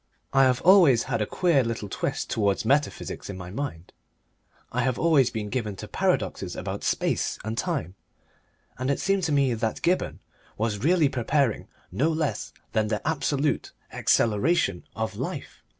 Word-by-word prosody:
I 135 0 +6
have 125 -1 +2
always 170 - +6
had 115 - -2
a 105 - 0
queer 170 -7 +2
little 115 -3 -3
twist - - -3
towards 100 -1 0
metaphysics 140 -2 0
in 95 - -5
my 90 -1 -8
mind. 100 - -5 0.8
I - - 0
have 130 -2 0
always 150 -7 +4
been 110 -3 -4
given 110 -6 -2
to - - -8
paradoxes - - -1
about - - -5
space - - 0
and 110 +1 -2
time, 135 - -2 0.9
and 130 +1 -1
it 140 - +1
seemed 195 0 +1
to 160 - -1
me 140 -3 +3
that 110 -1 -2
Gibberne 180 +2 +1 0.4
was 110 -1 -1
really 160 - +3
preparing 130 -5 0 0.2
no 150 +6 +1
less 155 -2 -2 0.2
than 110 -1 +1
the 105 +5 -2
absolute 145 -2 0 0.2
acceleration 110 - +2
of 110 -1 -3
life. - - -5
130 Hz, 160 wpm, -26 LUFS, 110-150 Hz, 0.9 s, I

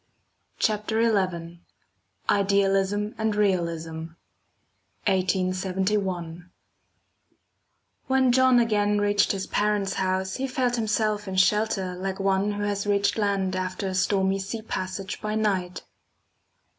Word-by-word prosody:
CHAPTER 215 +1 0
XI 175 -6 -1 0.7
IDEALISM 200 +1 +2
AND 220 -1 0
REALISM 165 -5 -1 0.9
(1871) 185 -2 -1 1.6
When 265 -1 +3
John 260 0 +5
again 210 -3 +2
reached 205 0 +2
his 195 -1 -3
parents' 205 -2 0
house, 190 0 -1
he 270 +1 -2
felt 255 -2 0
himself 215 -2 0
in 190 - -4
shelter 195 -1 +2
like 190 +1 -4
one 195 +1 +1
who 205 0 -3
has 205 0 -2
reached 200 +2 +1
land 195 -2 0
after 185 +1 -3
a 190 - -3
stormy 190 +1 +1
sea 220 +3 -5
passage 190 -1 -4
by 215 0 -2
night. 190 -4 -1
195 Hz, 110 wpm, -25 LUFS, 185-210 Hz, 1.6 s, John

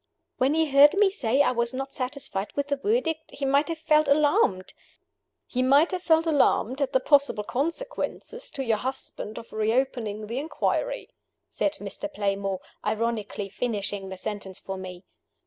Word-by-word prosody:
"When 270 +4 +2
he 320 0 +3
heard 290 +2 +6
me 400 -1 +4
say 270 - +2
I - - +2
was 235 0 -1
not 270 +1 -4
satisfied 255 -6 -3
with 285 0 -1
the 280 - +2
Verdict, 325 - -1
he 280 - -3
might 280 +2 +3
have 330 -1 -3
felt 305 -1 +3
alarmed 280 -10 +2 0.4
" - - -55 0.3
"He 255 - -1
might 280 +7 +5
have 370 -1 -2
felt 325 -1 +3
alarmed 285 -4 +2
at 270 -1 +1
the 260 - +3
possible 280 -6 +3
consequences 460 - -3
to 275 - -4
your 225 -4 +1
husband 255 -4 -5
of 230 - -10
reopening 220 -1 0
the 235 +5 -3
inquiry," - - -2 0.4
said 300 - 0
Mr. 295 +4 -6
Playmore, 195 -2 -2 0.2
ironically 220 -2 -2
finishing 200 -2 -3
the 190 - -7
sentence 200 -2 -5
for 195 - -6
me. 185 -1 -8
265 Hz, 165 wpm, -26 LUFS, 215-300 Hz, 0.4 s, heard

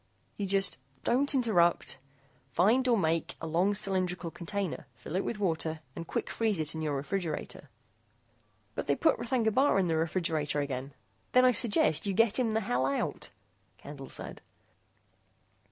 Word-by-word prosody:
You 200 - -3
just 195 -6 +2 0.2
don't 270 +4 +3
interrupt 175 - +2 0.5
find 220 - +3
or 240 -2 +4
make 165 -3 0
a - - -6
long 175 +6 +1
cylindrical 185 -4 0
container, 190 +2 -4
fill 165 - -8
it 190 - +1
with 230 - -3
water 160 -5 -1
and 165 -1 -6
quick - - -2
freeze 220 -6 0
it 155 -1 -1
in 160 - -5
your 150 -2 -1
refrigerator 160 +5 -4 0.5
" - - -39
"But - - -4
they - - +2
put 320 - +2
R'thagna 235 -2 0
Bar 265 -2 +3
in 185 -3 +2
the 165 - +1
refrigerator 160 -2 0
again 135 -1 -4 0.2
" - - -40
"Then 255 0 +6
I 255 - +6
suggest 215 - +2
you 195 - 0
get 230 +2 +3
him 230 -3 +1
the 220 - +1
hell 130 - 0
out," 140 - -2 0.5
Candle 140 -2 -10
said. - - -6
185 Hz, 170 wpm, -30 LUFS, 160-220 Hz, 0.5 s, Then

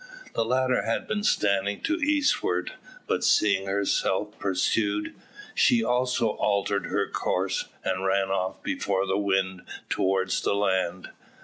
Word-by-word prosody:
The - - +1
latter 130 +2 +1
had 115 - -2
been 215 -1 -1
standing 100 - +1
to 315 - 0
the 310 -4 -1
eastward; 295 -1 +1 0.3
but - - -1
seeing 100 -2 +3
herself 100 +1 0
pursued, 100 +2 0 0.4
she 115 -1 +4
also 125 -1 +1
altered 100 -1 0
her - - 0
course, 95 +1 -1 0.2
and 90 +1 -1
ran 95 0 +1
off 95 -1 -2
before 95 -1 -1
the 95 +1 0
wind 95 -2 0 0.3
towards 95 0 +1
the - - 0
land. 95 -3 -1
100 Hz, 135 wpm, -26 LUFS, 95-115 Hz, 0.4 s, she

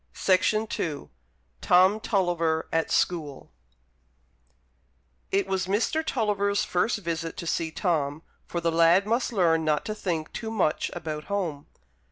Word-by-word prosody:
Tennyson 215 +3 +2 1.0
TOM 185 +4 +4
TULLIVER 175 -6 0
AT 165 0 +1
SCHOOL 155 -6 -1 1.8
It 195 0 +1
was 190 -1 -1
Mr. 230 +11 0
Tulliver's 205 -7 0
first 220 +7 0
visit 165 -4 -4
to - - -5
see 165 0 -1
Tom, 160 -3 -1 0.2
for 170 - -3
the 170 0 0
lad 170 +4 +4
must 235 +4 0
learn 165 -6 +2
not 155 -1 0
to 215 - -2
think 170 -7 -3
too 225 - -5
much 195 -8 0
about 155 -1 -5
home. 175 -8 -3
180 Hz, 130 wpm, -26 LUFS, 165-200 Hz, 1.8 s, TOM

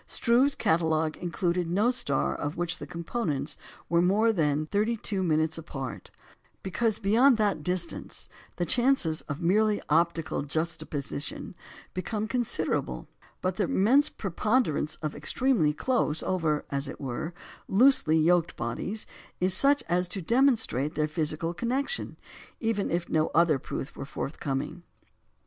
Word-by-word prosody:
Struve's 255 +4 +3
catalogue 160 -1 +1
included 175 -1 -1
no 205 +8 +2
star 145 - 0
of 145 +2 -4
which 175 0 -1
the - - -7
components 160 - -2 0.3
were 170 0 +3
more 210 +5 +3
than 150 -4 +1
32" 195 -5 +1
apart, 135 -5 -7 0.5
because 215 +3 0
beyond 230 +5 +4
that 205 -7 +1
distance 180 +1 -3 0.3
the 175 - -1
chances 240 - +3
of 150 +4 -4
merely 210 +4 +3
optical 165 +1 +1
juxtaposition 145 -1 -4 0.4
become 210 +3 -3
considerable; 240 -1 -1 0.4
but 185 0 -1
the - - +2
immense 270 +5 +3
preponderance 195 - 0
of 155 - -2
extremely 245 - +2
close 160 -3 0
over 160 -5 0
(as 140 +1 -1
it - - -8
were) 135 +5 -4 0.4
loosely 200 - +5
yoked 170 +1 +3
bodies 215 +2 -2 0.3
is 185 +1 +3
such 280 +8 +4
as 180 +1 +1
to 195 - -2
demonstrate 225 - +2
their 155 - +1
physical 155 +2 -2
connection, 260 - -2 0.4
even 225 -4 -1
if 170 +1 -1
no 155 -1 +1
other 160 -4 +4
proof 135 - -6
were - - -6
forthcoming. 140 +3 -4
175 Hz, 130 wpm, -28 LUFS, 155-220 Hz, 0.5 s, loosely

